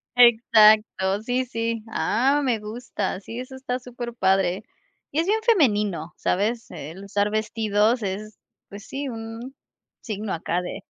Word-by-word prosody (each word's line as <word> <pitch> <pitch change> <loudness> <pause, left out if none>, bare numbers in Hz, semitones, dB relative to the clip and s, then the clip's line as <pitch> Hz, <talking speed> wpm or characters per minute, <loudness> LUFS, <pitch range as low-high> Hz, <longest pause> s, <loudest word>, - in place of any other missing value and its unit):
Exacto, 215 -4 +5
sí, 250 +2 0
sí. 230 -2 -3
Ah, 270 +9 +2
me 245 -5 +1
gusta, 210 -3 -4
sí, 225 +4 -8
eso 255 +1 -7
está 260 -1 -3
superpadre. 205 -7 0 0.5
Y 300 - 0
es 330 - +2
bien 430 +3 +1
femenino, 210 - +2
¿sabes? 225 +5 -1
El 160 +7 -8
usar 205 +1 0
vestidos 215 +1 +1
es, 205 +2 -4 0.3
pues 200 +1 -10
sí, 275 0 -4
un 230 +3 -7 0.5
signo 215 -2 -4
acá 170 +2 -1
de 180 - -6
220 Hz, 135 wpm, -24 LUFS, 205-245 Hz, 0.5 s, Exacto